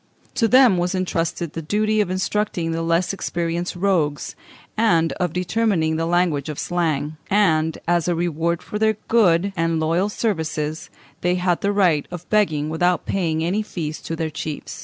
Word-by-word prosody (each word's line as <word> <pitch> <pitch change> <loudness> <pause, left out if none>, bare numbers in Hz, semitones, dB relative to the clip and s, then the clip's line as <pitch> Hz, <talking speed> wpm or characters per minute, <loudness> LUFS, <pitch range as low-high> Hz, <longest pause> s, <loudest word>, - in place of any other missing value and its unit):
To 230 - +2
them 250 -4 +6
was 180 +2 0
intrusted 170 -3 -2
the 165 - -4
duty 215 +6 +1
of 200 - -1
instructing 185 -2 -1
the 165 0 -2
less 165 +3 +1
experienced 175 -2 -3
rogues, 175 -6 0 0.4
and 170 -8 +3
of 180 -2 0
determining 180 -2 0
the 165 +1 -1
language 170 -5 +1
of 150 - -5
Slang; 155 -3 -1
and, 160 -6 +2
as 175 -1 +2
a 175 - +1
reward 170 0 -1
for 210 - -5
their 220 -1 +2
good 195 -4 +3
and 165 -1 0
loyal 165 +5 +1
services, 160 -8 -2 0.3
they 180 0 +1
had 180 -1 0
the 200 - +1
right 180 -8 +2
of 175 0 -8
begging 160 -9 +2
without 175 +3 0
paying 160 -4 -1
any 185 +6 0
fees 160 -7 -5
to 165 - -4
their 160 -1 -3
chiefs. 155 0 -6
175 Hz, 170 wpm, -22 LUFS, 160-195 Hz, 0.4 s, them